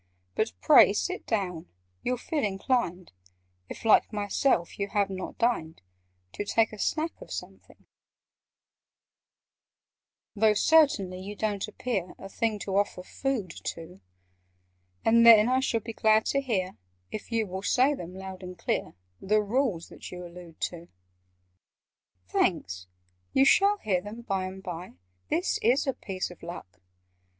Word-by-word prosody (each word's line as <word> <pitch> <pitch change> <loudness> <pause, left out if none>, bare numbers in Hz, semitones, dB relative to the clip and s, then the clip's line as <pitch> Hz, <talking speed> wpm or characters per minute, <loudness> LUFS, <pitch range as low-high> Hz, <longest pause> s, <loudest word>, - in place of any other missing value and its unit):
But 220 - -1
pray 285 -9 +7
sit 365 - -3
down: 180 -7 -2 0.3
you'll 250 0 -1
feel 295 +4 -2
inclined 195 - -1 0.6
(If, - - -9
like 220 - +5
myself, 205 -2 0
you 200 - -1
have 200 -1 0
not 185 -1 -6
dined) 165 -10 0 0.5
To - - -3
take 220 +1 +1
a 215 - -9
snack 320 +8 0
of - - -11
something: - - -9 2.5
"Though, 215 0 +4
certainly, 210 - +3
you 200 +2 -7
don't 205 -2 -2
appear 215 -4 -3
A 195 - -9
thing 220 +1 -1
to 195 -1 -1
offer 200 -2 0
food 235 -4 -3
to! 165 - -6 1.0
And 230 +1 +5
then 225 -2 +9
I 255 +1 +3
shall 240 -4 0
be 230 +2 -7
glad 220 0 +3
to 275 - +2
hear— 190 -8 -2 0.3
If 215 - -7
you 225 -1 +1
will 190 0 -5
say 255 +8 +3
them 180 -8 -7
loud 190 0 -8
and 180 -1 -8
clear— - - -2 0.3
The 210 +2 +2
Rules 215 -6 -1
that - - -10
you 180 0 -7
allude 175 -1 -12
to." 170 -1 -4 1.4
"Thanks! 90 - 0 0.5
You 270 - +5
shall 405 +7 +5
hear 195 - 0
them 210 +4 -8
by 195 -4 -1
and 190 +1 -8
by. 175 0 -6 0.4
This 180 - 0
is 250 +7 +3
a 270 - 0
piece 185 -5 -5
of 175 - -14
luck!" 170 - -9
205 Hz, 145 wpm, -28 LUFS, 185-235 Hz, 2.5 s, then